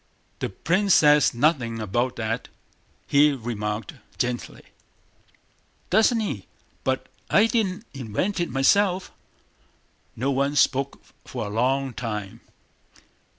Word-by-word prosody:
"The - - -2
prince 190 +2 +2
says 150 -1 +5
nothing 120 -4 +1
about 120 +4 -1
that," 115 +1 -3 0.6
he 145 +1 +4
remarked 110 -4 -4 0.2
gently. 120 0 -3 1.3
"Doesn't 225 +2 +4
he? 210 - -4 0.4
But - - -1 0.2
I 210 - +5
didn't 220 -3 -1
invent 135 - -2
it 175 - -1
myself." 185 - +2 1.0
No 135 +5 -1
one 140 +2 0
spoke 140 -1 +1 0.2
for - - -5
a - - -5
long 130 +3 +1
time. 105 -5 -5
135 Hz, 110 wpm, -24 LUFS, 115-175 Hz, 1.3 s, says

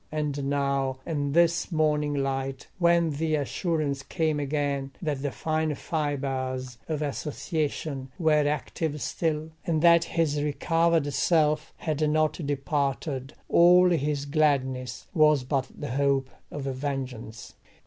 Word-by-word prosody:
And 145 -2 -2
now 140 -2 0
in 145 -3 -2
this 170 +2 +3
morning 150 -2 +1
light, 135 -1 -2
when 170 -2 +4
the 155 +2 0
assurance 150 -1 -1
came 155 +1 -1
again 140 -1 -1
that 150 -5 -2
the 145 - -1
fine 155 +2 -1
fibres 130 -5 -3
of 155 -1 -1
association 150 -1 -3
were 150 -3 +3
active 150 +1 -2
still, 155 +4 -2
and 160 -2 0
that 170 -1 +6
his 160 -4 0
recovered 165 0 +1
self 155 -1 +2
had 155 -1 0
not 155 +2 +1
departed, 140 -1 -2
all 180 +1 +6
his 145 -3 0
gladness 130 -5 0
was 150 -5 +4
but 130 0 -1
the 145 -5 -4
hope 135 0 +1 0.2
of 145 - -6
vengeance. 130 -5 -5
145 Hz, 125 wpm, -27 LUFS, 135-155 Hz, 0.2 s, that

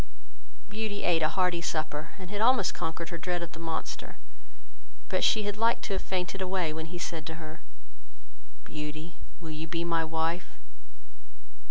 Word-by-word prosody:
Beauty 210 0 -2
ate 170 -2 +4
a 155 - +5
hearty 180 -2 +3
supper, 155 -2 -1
and 185 -1 -8
had 205 0 -1
almost 235 -4 +6
conquered 165 +1 -2
her 170 -1 -4
dread 175 0 0
of 170 - -5
the 165 - -9
monster; 165 -1 -3 0.9
but - - +2
she 215 - +6
had 205 0 -1
liked 230 +1 +4
to 200 - -1
have 190 - +1
fainted 185 +1 -1
away, 185 -4 +1
when 160 0 -3
he 175 +2 -5
said 165 -2 -2
to 160 - -3
her, 160 -1 -8 1.0
"Beauty, 155 +2 -5 0.2
will 165 -3 -6
you 155 +1 -4
be 165 +1 0
my 165 -1 +3
wife?" 160 +2 0
170 Hz, 170 wpm, -31 LUFS, 160-190 Hz, 1.0 s, almost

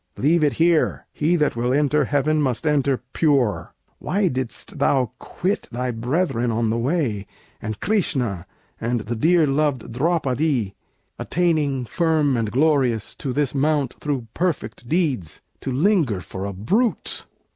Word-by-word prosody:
Leave 155 +4 +3
it 145 - +3
here! 165 -1 +2
He 160 +4 +1
that 150 -6 +1
will 120 +1 0
enter 150 +2 +2
heaven 150 +2 +1
must 130 +1 -1
enter 140 -4 +1
pure. 125 - +1 0.2
Why 195 0 +1
didst 130 +3 -4
thou 130 -4 +2
quit 190 +3 -3
thy 125 +1 -2
brethren 120 +1 0
on 115 -1 0
the 115 - 0
way, 120 - -1 0.3
And 110 -1 -5
Krishna, 125 - -1 0.3
and 120 0 -1
the 115 +3 -4
dear 165 +7 +4
loved 140 -4 0
Draupadí, 135 - 0 0.5
Attaining, 150 -6 0
firm 155 -1 +1
and 115 -3 0
glorious, 130 -5 +2
to 135 - -3
this 140 0 0
Mount 145 -1 +1
Through 140 -5 -2
perfect 145 -9 -2
deeds, 145 - -1 0.2
to 135 - -4
linger 150 - +2
for 95 +1 -6
a 100 - -4
brute? 205 - 0
140 Hz, 145 wpm, -22 LUFS, 120-155 Hz, 0.5 s, dear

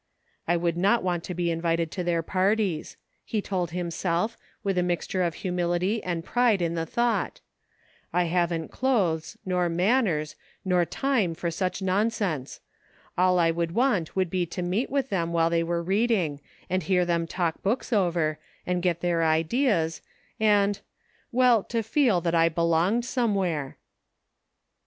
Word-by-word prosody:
" - - -42
I 175 +1 +3
would 170 0 -1
not 200 +5 +3
want 175 -2 -1
to 180 - -5
be 175 0 0
invited 165 -1 0
to 180 - -3
their 170 -1 0
par 190 +5 +2
ties," 195 -8 -3 0.3
he 220 - -2
told 185 -4 -2
himself, 175 +4 -1 0.3
with 195 -2 0
a - - +3
mixture 180 +1 -1
of 170 -2 0
humility 180 +4 0
and 170 -2 -3
pride 240 -5 +2
in 170 -1 0
the 165 -1 -2
thought; 235 -1 0 0.4
*' - - -37 0.3
I 180 - +2
haven't 170 -1 -1
clothes, 190 -12 0
nor 180 -2 +1
manners, 175 - +1 0.3
nor 180 -2 +3
time 225 -8 0
for 170 0 -3
such 185 +3 -2
nonsense; 190 - -1 0.5
all 180 0 +3
I 165 -1 +4
would 170 0 -2
want 235 -10 +1
would 185 -3 0
be 180 -2 0
to 180 - -4
meet 190 +8 -1
with 275 -1 -1
them 170 -3 -1
while 165 0 +2
they 170 0 +2
were 170 0 -1
reading, 190 -6 +1 0.3
and 185 +1 0
hear 180 +2 +2
them 170 -1 0
talk 170 -2 -2
books 235 +4 -1
over, 170 -6 +1 0.3
and 180 0 -1
get 170 -2 0
their 170 -2 +1
ideas, 165 - +1 0.4
and 205 -2 +3 0.3
— - - -38
well, 245 -3 +4
to 230 -1 -2
feel 225 -5 +2
J;hat 170 -1 -1
I 165 0 +4
belonged 170 +8 +1
somewhere." 195 - -1
180 Hz, 165 wpm, -26 LUFS, 170-205 Hz, 0.5 s, I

